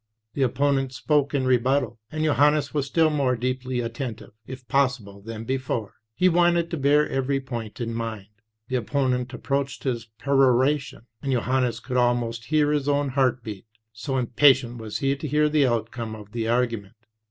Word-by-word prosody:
The 140 - -3
opponent 135 +1 +1
spoke 145 +3 +1
in 135 -2 +1
rebuttal, 125 -2 +1
and 155 0 -2
Johannes 145 0 +3
was 145 -2 -1
still 160 +2 +3
more 135 -4 +1
deeply 125 +1 -2
attentive, 115 -1 -5 0.2
if 130 -1 -9
possible, 125 -7 0
than 115 +1 -7
be 130 +3 -1
fore; 115 -5 -4 0.2
he 180 - +3
wanted 175 -1 +3
to 170 - -2
bear 145 +2 +3
every 135 +1 0
point 120 -5 -6
in 115 -1 -3
mind. 115 -3 -4 0.4
The 130 - 0
opponent 125 0 -1
approached 140 +2 -3
his 120 -4 -2
peroration, 135 0 +2 0.2
and 135 - -2
Johannes 125 -1 0
could 125 +1 -3
almost 120 -2 +1
hear 150 0 +2
his 145 -1 0
own 145 0 +1
heart 130 -2 +1
beat, 105 -1 -8 0.3
so 135 +5 -3
impatient 125 -1 +3
was 110 -2 -4
he 135 0 0
to 145 +2 -6
hear 150 +2 +3
the 150 -3 +3
outcome 115 -1 -2
of 105 -1 -12
the 115 -1 -2
argument. 115 -4 -1
130 Hz, 175 wpm, -24 LUFS, 115-140 Hz, 0.4 s, Johannes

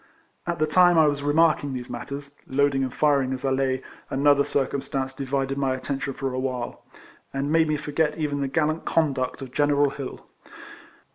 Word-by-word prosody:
At - - -1
the 155 - +2
time 175 +2 +5
I 160 - +7
was 145 -1 +1
remarking 145 -1 +2
these 125 -1 -5
mat 120 -1 -6
ters 140 0 -7
(loading 135 0 +2
and 130 - -2
firing 140 -2 +2
as 130 +1 -5
I 135 - +1
lay), 130 -1 0 0.3
another 140 +1 +4
circumstance 135 -1 -1
divided 135 0 -2
my 135 -2 +1
attention 135 +1 -4
for 135 -1 -3
a 130 - -2
while, 130 -2 -4 0.5
and 140 +2 -2
made 160 0 +4
me 155 0 +1
forget 150 +1 -1
even 145 -3 -1
the 140 - 0
gallant 155 +3 0
conduct 135 -4 0
of 130 - -9
General 145 -1 +3
Hill. 135 -2 -7
140 Hz, 185 wpm, -25 LUFS, 135-150 Hz, 0.5 s, I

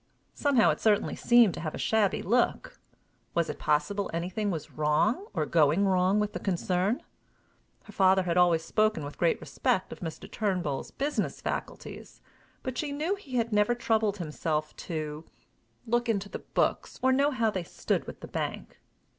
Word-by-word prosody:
Somehow 255 - +3
it 150 - -4
certainly 210 -2 +2
seemed 240 -6 +5
to - - -6
have 155 -2 -4
a - - -5
shabby 220 -3 +1
look! 240 +5 0 0.6
Was 170 -1 +1
it - - -11
possible 155 +7 0
anything 185 +5 -2
was 165 -5 -4
wrong 155 - +1
or 160 -4 -1
going 160 +4 +3
wrong 190 +1 +3
with 210 0 -1
the - - -4
concern? 185 +3 0 0.8
Her 210 - -14
father 190 -1 +4
had 170 -2 -1
always 175 -2 +4
spoken 215 -6 +1
with 145 - -9
great 170 - +2
respect 185 - -1
of - - -12
Mr. 165 -3 -6
Turnbull's 180 -10 -2
business 290 +2 -2
faculties, - - -6 0.4
but 255 -1 -4
she 295 -2 -2
knew 305 +6 -1
he 295 -11 -7
had 230 -2 0
never 210 +3 +3
troubled 220 -3 +1
himself 155 -2 -3
to, 155 -2 -5 0.6
look 240 +1 0
into 200 -2 0
the - - -6
books - - -1
or 260 - +5
know 280 +2 +3
how 230 -6 +1
they 190 - -2
stood 170 - -2
with - - -9
the - - -7
bank. - - -5
195 Hz, 170 wpm, -28 LUFS, 170-230 Hz, 0.8 s, seemed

